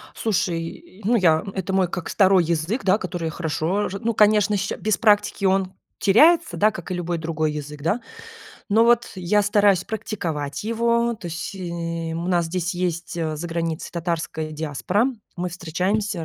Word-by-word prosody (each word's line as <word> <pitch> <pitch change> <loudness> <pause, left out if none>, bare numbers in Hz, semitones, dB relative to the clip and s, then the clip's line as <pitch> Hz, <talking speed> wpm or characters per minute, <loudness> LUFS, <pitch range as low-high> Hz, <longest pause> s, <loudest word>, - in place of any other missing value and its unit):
Слушай, 180 -2 -3
ну, 235 +4 +3
я, 165 -7 +4
это 190 0 -3
мой 190 -1 +3
как 175 0 -5
2 190 -2 +4
язык, 170 +9 -1
да 190 +1 +4
который 175 -6 -4
я 160 - -2
хорошо 170 +5 -1
ж 195 - -5
ну 230 +3 -1
конечно, 210 -1 +4
щ - - -2
без 215 -1 0
практики 205 -2 +2
он 190 0 +2 0.3
теряется, 320 - +5
да 215 +1 +4
как 175 -3 -8
и - - 0
любой 175 -1 -2
другой 160 -1 -1
язык 150 0 -7
да. 170 +11 0 0.7
Но 220 +2 +4
вот 240 0 +3
я 190 +3 +1
стараюсь 205 -2 +3
практиковать 165 -10 -4
его. 235 +1 +1
То 210 -5 -9
есть, 170 +4 -5
э, 170 -3 -4
у 170 +1 -3
нас 175 -2 +2
здесь 180 +1 -2
есть, 175 -1 -3
э, 160 -2 -2
за 165 +3 -5
границей 165 0 -3
татарской 165 -2 -3
диаспора. 160 - 0 0.3
Мы 180 0 -2
встречаемся 180 +2 -2
180 Hz, 175 wpm, -23 LUFS, 165-210 Hz, 0.7 s, теряется